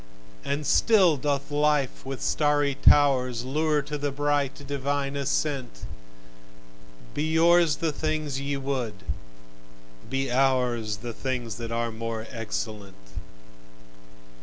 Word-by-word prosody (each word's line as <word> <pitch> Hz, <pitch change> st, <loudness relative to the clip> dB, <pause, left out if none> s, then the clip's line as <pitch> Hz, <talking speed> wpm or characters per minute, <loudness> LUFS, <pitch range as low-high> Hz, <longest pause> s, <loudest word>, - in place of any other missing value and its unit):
And 145 Hz, +2 st, -2 dB
still 185 Hz, -, +5 dB
doth 140 Hz, +1 st, -2 dB
life 145 Hz, -2 st, +1 dB
with 135 Hz, -1 st, -5 dB
starry 145 Hz, -1 st, +2 dB
towers 130 Hz, -4 st, +4 dB
Lure 150 Hz, +2 st, +1 dB
to 150 Hz, +1 st, -5 dB
the 145 Hz, 0 st, -1 dB
bright, 145 Hz, 0 st, -1 dB
divine 140 Hz, 0 st, -2 dB
ascent! 140 Hz, -, -2 dB, 1.3 s
Be -, -, -2 dB
yours 170 Hz, -1 st, +5 dB
the 160 Hz, +2 st, -1 dB
things 155 Hz, -2 st, -2 dB
ye 140 Hz, 0 st, -2 dB
would: 135 Hz, -5 st, -3 dB, 1.1 s
be 135 Hz, -1 st, -1 dB
ours 125 Hz, -5 st, +1 dB
The 120 Hz, -, -4 dB
things 125 Hz, -2 st, -3 dB
that 115 Hz, -1 st, -6 dB
are 115 Hz, 0 st, -1 dB
more 115 Hz, 0 st, -4 dB
excellent. 105 Hz, -3 st, -5 dB
140 Hz, 110 wpm, -26 LUFS, 125-145 Hz, 1.3 s, still